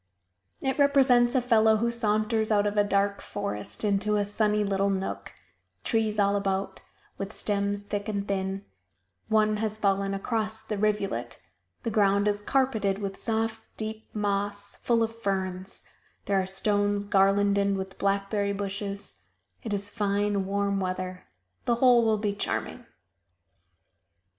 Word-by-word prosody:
It 265 +2 -1
represents 265 -4 +5
a 260 - +4
fellow 220 -2 +4
who 235 +2 +1
saunters 220 -1 0
out 205 -1 +3
of 205 0 0
a 205 - +4
dark 200 0 +1
forest 200 - -5
into 210 0 +1
a 205 -1 +1
sunny 210 0 +1
little 200 0 +1
nook; 190 -1 -3 0.5
trees 220 -2 +1
all 200 -1 +3
about, 195 -1 -1 0.4
with 195 +1 -4
stems 205 -1 -1
thick 205 +1 -3
and 200 -1 -2
thin; 195 0 -2 0.6
one 215 -1 +3
has 215 0 -1
fallen 195 -1 +1
across 220 +1 -2
the 220 -1 -3
rivulet; 210 -2 -1 0.4
the 230 - -1
ground 200 -1 +3
is 205 0 0
carpeted 220 -6 +1
with 200 -1 -4
soft, 225 0 -1 0.2
deep 220 0 -5
moss, 205 -1 -2
full 230 -1 +1
of 225 0 -4
ferns; 190 -1 -2 0.4
there 195 -1 +2
are 185 - -4
stones 205 +1 0
garlanded 200 0 +3
with 190 0 -6
blackberry 200 +1 0
bushes; 200 - -5 0.4
it 220 - -5
is 205 0 -2
fine 205 -2 0
warm 200 0 0
weather; 185 -1 -4 0.4
the 235 - +3
whole 245 -1 +5
will 220 -1 +3
be 205 -1 -1
charming. 205 - -3
205 Hz, 145 wpm, -27 LUFS, 200-220 Hz, 0.6 s, represents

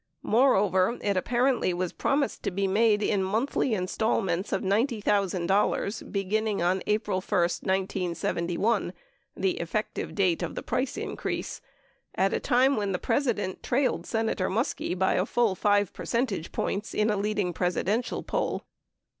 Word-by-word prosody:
Moreover, 210 -4 +3
it 200 -1 +1
apparently 240 -1 +1
was 180 0 -2
promised 280 0 0
to - - -1
be 195 +1 -1
made 210 +2 +3
in 205 -2 +1
month 220 +8 -1
1a 250 - +1
installments 190 -1 0
of 195 - 0
$90,000 200 -2 +1
beginning 210 +1 0
on 180 +2 +1
April 210 -3 0
1, 200 0 0 0.2
1971 185 +1 -1 0.4
(the 190 -1 0
effective 190 +6 -3
date 185 -5 +2
of - - -4
the - - -5
price 255 +2 -2
increase) - - -4 0.5
at 195 +1 +2
a - - +1
time 265 +1 +3
when 200 -2 -1
the - - +1
President 205 -6 -1
trailed 260 +2 0
Senator 225 -4 0
Muskie 215 -4 -1
by 190 +1 +2
a 185 - +1
full 235 -5 +2
5 205 0 +2
percentage 230 -9 -2
points 205 +2 -3
in 215 +1 +2
a - - +1
leading 205 -3 -1
Presidential 190 +7 -1
poll. - - -2
205 Hz, 145 wpm, -27 LUFS, 185-225 Hz, 0.5 s, Moreover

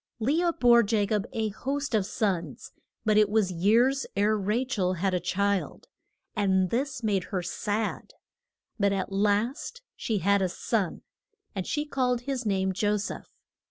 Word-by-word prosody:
Le 285 +10 +1
ah 345 - +3
bore 240 -7 +5
Ja 210 -1 +1
cob 210 +1 -1
a 220 -1 -1
host 275 +6 -3
of 205 -3 +2
sons, 175 - -2 0.3
but 215 -1 +4
it 210 -1 +4
was 210 -3 +2
years 230 +10 +2
ere 205 +2 +3
Ra 210 +4 0
chel 190 -8 0
had 185 +2 -1
a 180 - +1
child. 200 +2 -1 0.5
And 190 -3 +2
this 260 0 -2
made 200 -4 +1
her 185 -3 -3
sad. 210 +5 -3 0.6
But 200 -1 +3
at 195 0 -2
last 215 - 0
she 220 - -2
had 200 +2 +2
a 185 - +1
son, 190 0 -2 0.5
and 190 -3 -4
she 295 -1 -1
called 250 -4 0
his 255 -2 -3
name 190 -1 +1
Jo 205 +3 +1
seph. 200 - -6
210 Hz, 165 wpm, -27 LUFS, 195-235 Hz, 0.6 s, bore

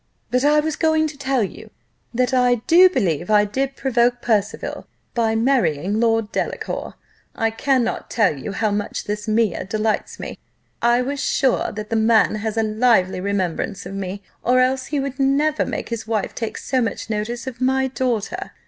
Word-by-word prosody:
But 250 +1 +2
I 300 +1 +5
was 310 0 -2
going 315 -1 +2
to 300 - -10
tell 270 -3 0
you, 195 - -7 0.4
that 250 +2 0
I 250 -1 +4
do 360 +3 +7
believe 180 - -1
I 210 -1 +5
did 270 +6 -2
provoke 245 -2 +1
Percival 210 -4 -1 0.3
by 225 -2 +1
marrying 220 - +1
Lord 225 -2 +1
Delacour: - - -3 0.4
I 225 0 0
cannot 255 +1 0
tell 215 -9 +2
you 140 +9 -6
how 215 +1 0
much 205 0 -2
this 210 +1 -4
Mea 215 -4 +1
delights 215 +2 -2
me - - -7 0.4
I 240 +1 +4
am 255 +3 -1
sure 265 -1 +1
that 210 +1 -7
the - - +1
man 220 0 +4
has 220 0 -3
a 225 - +3
lively 215 -4 +2
remembrance 195 -1 -2
of - - -7
me, 195 0 -5 0.2
or 250 +1 +3
else 255 +1 +1
he 295 - -1
would 275 0 -4
never 285 +3 +2
make - - -4
his 230 -2 -4
wife 220 -3 -1
take 225 -2 -4
so 260 -1 -1
much 230 - -3
notice 225 +3 -3
of 255 -2 -7
my 265 +1 +2
daughter." 260 - -2
230 Hz, 180 wpm, -21 LUFS, 210-265 Hz, 0.4 s, do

